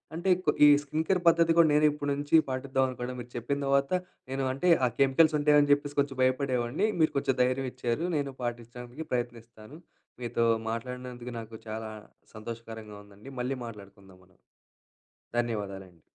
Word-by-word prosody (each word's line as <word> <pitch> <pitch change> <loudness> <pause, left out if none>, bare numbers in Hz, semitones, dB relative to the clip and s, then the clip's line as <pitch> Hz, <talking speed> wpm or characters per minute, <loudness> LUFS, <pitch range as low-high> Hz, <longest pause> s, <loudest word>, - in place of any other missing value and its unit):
అంటే 175 +3 -1 0.2
కొ 150 - +4
ఈ - - +9 0.2
స్కిన్ 155 +3 -2
కేర్ 185 -2 +2
పద్ధతి 165 0 +5
కూడా 165 -2 +7
నేను 150 +1 +4
ఇప్పటి 145 -1 -4
నుంచి 145 +2 0
పాటిద్దాం 130 0 0
అనుకుంటున్న, 125 0 -5
మీరు 120 +1 -12
చెప్పిన 140 +5 -2
తర్వాత 140 +1 +2 0.4
నేను 135 0 -2
అంటే 175 +7 0 0.2
ఆ - - 0
కెమికల్స్ 150 +3 +4
ఉంటాయని 145 -1 +4
చెప్పేసి 145 0 -3
కొంచెం 140 -2 0
భయపడేవాడిని, 130 - +1
మీరు 155 - +3
కొంచెం 135 -2 0
ధైర్యం 130 +1 +1
ఇచ్చారు. 125 +6 -2
నేను 140 -2 -3
పాటించడానికి 120 +4 -6
ప్రయత్నిస్తాను. 120 +1 -5 0.4
మీతో 115 0 0 0.2
మాట్లాడినందుకు 125 +1 -6
నాకు 110 0 -9
చాలా 110 0 -5 0.5
సంతోషకరంగా 110 -1 -8
ఉందండి. 105 +6 -14
మళ్ళీ 130 +1 -2
మాట్లాడుకుందాం 100 -4 -12
మనం. 95 0 -28 1.0
ధన్యవాదాలండి. 100 -7 -4
125 Hz, 150 wpm, -29 LUFS, 115-145 Hz, 1.0 s, ఈ